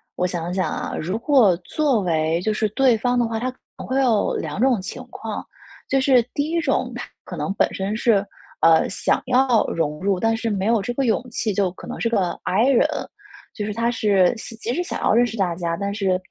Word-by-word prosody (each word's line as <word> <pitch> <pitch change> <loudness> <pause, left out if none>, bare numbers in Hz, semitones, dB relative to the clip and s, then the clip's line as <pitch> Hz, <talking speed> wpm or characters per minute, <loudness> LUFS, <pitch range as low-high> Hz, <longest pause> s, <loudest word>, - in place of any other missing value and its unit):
我 180 - 0
想 175 -1 -3
想 185 0 0
啊。 - - -4
如 185 +7 -2
果 235 - +4
作 255 - 0
为 165 -2 0
就 215 - 0
是 215 0 0
对 250 +1 +3
方 245 +2 0
的 240 - +2
话， 225 -1 -3
他 255 +2 -2
可 255 - -26 0.2
能 - - -8
会 265 +1 +1
有 230 -6 +2
2 - - -4
种 245 -5 +3
情 195 +6 -7
况。 220 -2 -6 0.4
就 270 0 +2
是 260 -4 +4
第 290 +1 -1
1 335 - 0
种 295 -4 0
他 - - -5 0.2
可 - - -8
能 195 - -2
本 - - +1
身 195 +2 -2
是， 215 -3 +2 0.4
呃， 165 -1 +5
想 - - 0
要 255 -2 +3
融 150 -2 -2
入， 195 -1 0
但 225 +2 +2
是 225 0 -2
没 195 -2 -1
有 225 -1 +2
这 220 - -3
个 270 0 0
勇 225 - +2
气， 220 -2 -2
就 195 -1 +1
可 - - -11
能 - - -6
是 230 - +1
个 195 -6 +1
i 220 +7 +2
人， 265 - +4 0.7
就 210 - -4
是 210 - -3
他 230 +2 0
是 200 -5 +3
即 230 +1 -5
使 355 - -1
想 355 - -4
要 - - +3
认 240 +2 +4
识 225 0 -7
大 180 -4 0
家， 170 -1 -2
但 200 0 -3
是 190 -3 0
220 Hz, 245 characters per minute, -22 LUFS, 190-245 Hz, 0.7 s, 呃